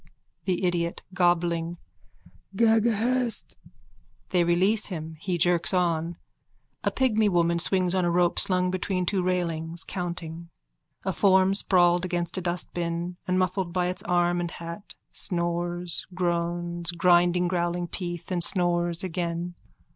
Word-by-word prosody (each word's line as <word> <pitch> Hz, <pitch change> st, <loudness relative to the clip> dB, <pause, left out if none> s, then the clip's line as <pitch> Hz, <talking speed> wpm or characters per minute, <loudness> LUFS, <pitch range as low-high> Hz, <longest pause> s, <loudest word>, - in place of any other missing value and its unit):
THE 185 Hz, -1 st, 0 dB
IDIOT: 170 Hz, -1 st, -1 dB
(Gobbling.) 175 Hz, -2 st, +1 dB, 0.8 s
Ghaghahest. 230 Hz, +2 st, +1 dB, 0.8 s
_(They 180 Hz, -1 st, +3 dB
release 190 Hz, +6 st, +2 dB
him. 160 Hz, -4 st, -6 dB
He 180 Hz, +1 st, -2 dB
jerks 175 Hz, +2 st, +2 dB
on. 170 Hz, -1 st, 0 dB, 0.7 s
A -, -, +2 dB
pigmy 220 Hz, -5 st, +2 dB
woman 170 Hz, -2 st, +2 dB
swings 185 Hz, +1 st, +3 dB
on 185 Hz, -1 st, +1 dB
a 175 Hz, -, +1 dB
rope 175 Hz, 0 st, +2 dB
slung 180 Hz, -1 st, +2 dB
between 185 Hz, 0 st, -1 dB
two 190 Hz, +1 st, 0 dB
railings, 170 Hz, -2 st, -1 dB
counting. 170 Hz, -2 st, -6 dB, 0.6 s
A 190 Hz, -, 0 dB
form 190 Hz, +1 st, +4 dB
sprawled 175 Hz, -3 st, +5 dB
against 175 Hz, -1 st, -1 dB
a 185 Hz, -, 0 dB
dustbin 175 Hz, 0 st, -3 dB
and 185 Hz, 0 st, +1 dB
muffled 185 Hz, -1 st, -1 dB
by 180 Hz, -1 st, 0 dB
its 185 Hz, -, -2 dB
arm 175 Hz, 0 st, +1 dB
and 175 Hz, -, -3 dB
hat 170 Hz, +5 st, -9 dB, 0.2 s
snores, 175 Hz, -1 st, -2 dB
groans, 175 Hz, -1 st, -1 dB
grinding 175 Hz, 0 st, +3 dB
growling 175 Hz, 0 st, -1 dB
teeth, 175 Hz, 0 st, -5 dB
and 175 Hz, -2 st, +1 dB
snores 175 Hz, -1 st, +1 dB
again. 175 Hz, -1 st, -3 dB
175 Hz, 130 wpm, -26 LUFS, 170-185 Hz, 0.8 s, sprawled